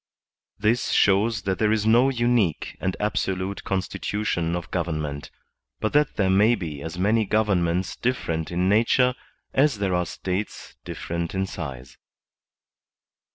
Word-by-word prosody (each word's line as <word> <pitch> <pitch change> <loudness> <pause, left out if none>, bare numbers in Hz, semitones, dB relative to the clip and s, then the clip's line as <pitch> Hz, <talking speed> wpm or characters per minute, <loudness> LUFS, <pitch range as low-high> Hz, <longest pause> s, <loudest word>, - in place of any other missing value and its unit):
This 110 +3 +1
shows 105 +2 +3
that 95 -2 -1
there 105 -1 +3
is 110 -1 +1
no 120 +4 +5
unique 120 - +1
and 95 0 -2
ab 105 0 0
solute 95 +1 -2
constitution 95 -2 -2
of 85 - -6
government, 75 -5 -3 0.5
but 110 - -1
that 150 -1 +3
there 100 - +1
may 105 +5 +5
be 80 -8 -6
as 80 +3 -6
many 105 +5 +2
governments 95 -4 +1
different 85 -11 -2
in 90 +2 +1
nature 120 +5 +3 0.4
as 140 -3 +3
there 100 -2 0
are 90 -1 0
States 95 +3 -4
different 85 +1 -4
in 95 0 0
size. 65 -9 -7
95 Hz, 140 wpm, -24 LUFS, 85-110 Hz, 0.5 s, no